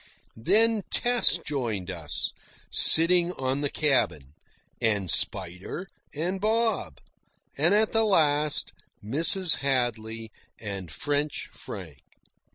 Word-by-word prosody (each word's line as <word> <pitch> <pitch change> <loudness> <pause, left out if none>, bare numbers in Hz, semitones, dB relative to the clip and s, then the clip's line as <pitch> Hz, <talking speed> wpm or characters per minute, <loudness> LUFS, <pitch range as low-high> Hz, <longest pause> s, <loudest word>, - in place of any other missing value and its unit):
Then 215 - +2
Tess 245 -6 +3
joined 115 - -4
us, 80 -5 -3 0.4
sitting 175 +2 +6
on 135 -1 -3
the 145 - -1
cabin; 105 - -1 0.5
and 100 -5 0
Spider, 95 - -1 0.2
and 180 +6 -4
Bob; 215 - -1 0.6
and 165 +8 +2
at 215 +1 +1
the 225 0 +1
last, 150 -7 +1 0.3
Mrs. 165 - +4
Hadley 115 -4 -3 0.3
and 100 -6 -7
French 145 - -3
Frank. - - -10
145 Hz, 100 wpm, -25 LUFS, 110-180 Hz, 0.6 s, sitting